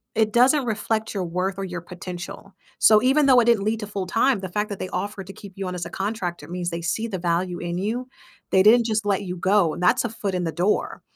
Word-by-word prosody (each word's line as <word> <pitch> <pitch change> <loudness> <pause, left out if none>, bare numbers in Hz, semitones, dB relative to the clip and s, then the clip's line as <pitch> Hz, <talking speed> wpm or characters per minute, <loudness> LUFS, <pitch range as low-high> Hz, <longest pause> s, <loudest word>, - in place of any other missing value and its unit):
it 215 -1 +1
doesn't 255 +3 +4
reflect 220 0 -2
your 190 -2 -2
worth 185 +3 -2
or - - -2
your 175 -2 -5
potential. 180 +2 -8 0.3
So, 215 -1 +7
even 275 +2 +4
though 255 -2 +7
it 230 - +1
didn't 235 -4 +3
lead 215 +2 0
to 210 - -5
full 195 -3 -4
time, 230 +3 +2
the 190 -1 -6
fact 210 +4 -2
that 200 - -6
they 185 - -4
offered 195 0 -4
to 195 - -9
keep 195 -1 -12
you 195 -1 -4
on 180 - -4
as 175 - -4
a - - -8
contractor 195 -3 -4
means 175 0 -3 0.2
see 225 +6 -1
the 195 -5 -4
value 175 +1 -1
in 175 0 -3
you, 230 +6 -2 0.4
they 190 - +5
didn't 230 +3 +6
just 215 -1 -1
let 200 0 +1
you 180 -1 -5
go, 190 -2 +3
and 180 - -5
that's 180 - +4
a - - -1
foot 205 -3 -4
in 180 -1 -1
the 165 - -1
door. 185 +4 0
195 Hz, 260 wpm, -23 LUFS, 180-220 Hz, 0.4 s, So